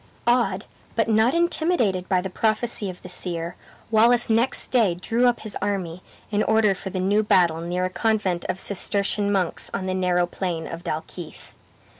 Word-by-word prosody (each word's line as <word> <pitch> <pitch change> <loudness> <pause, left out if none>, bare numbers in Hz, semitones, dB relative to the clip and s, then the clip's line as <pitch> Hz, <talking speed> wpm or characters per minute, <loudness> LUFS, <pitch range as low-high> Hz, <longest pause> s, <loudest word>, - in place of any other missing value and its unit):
Awed, 235 -5 +2 0.3
but 225 - +1
not 225 +4 +3
intimidated 320 - +1
by 185 -2 +2
the 190 - -4
prophecy 215 0 0
of 180 - -10
the - - -8
seer, 175 -1 -2 0.4
Wallace 230 +2 +4
next 230 +4 +1
day 220 -9 +3
drew 230 +7 +1
up 245 - +1
his 215 -2 -6
army 185 -4 -2 0.3
in 205 0 +1
order 220 -2 +3
for 190 0 -7
the 185 - -4
new 200 +3 +2
battle 175 -6 +3
near 175 +2 -1
a - - -1
convent 205 -5 0
of 185 - -3
Cistercian 200 +1 0
monks 190 -4 -1
on 185 - -3
the 185 - -1
narrow 180 -1 +1
plain 175 -2 -4
of 165 +1 -7
Dalkeith. 165 0 -7
195 Hz, 175 wpm, -24 LUFS, 180-220 Hz, 0.4 s, Wallace